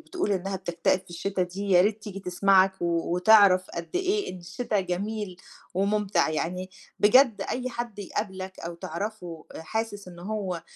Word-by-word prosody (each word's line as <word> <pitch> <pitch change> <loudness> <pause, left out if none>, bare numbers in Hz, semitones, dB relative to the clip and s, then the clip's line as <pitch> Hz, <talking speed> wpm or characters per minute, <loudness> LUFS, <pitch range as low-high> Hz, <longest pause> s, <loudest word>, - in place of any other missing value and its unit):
بتقول 360 - -2
إنّها 195 +1 -2
بتكتئب 175 0 0
في 185 -1 -21
الشتا 185 +2 -2
دي، 195 +3 -4
يا 180 - +7
ريت 210 +1 0
تيجي 195 -2 -7
تسمعك 190 +1 +4
وتعرف 180 +3 +4
قد 170 0 -6
إيه 390 +2 0
إن 185 - -8
الشتا 205 +4 -2
جميل 190 +1 -3 0.4
ومُمتع. 200 -2 +1
يعني 180 +4 -3 0.3
بجد 220 -1 +5
أي 255 0 -2
حد 235 -3 -5
يقابلك 190 -1 -5
أو 170 +1 -5
تعرفه 170 -1 -6
أ - - -8
حاسس 205 +1 -4
إنه 175 -1 -11
هو 190 -4 -3
195 Hz, 155 wpm, -27 LUFS, 180-210 Hz, 0.4 s, يا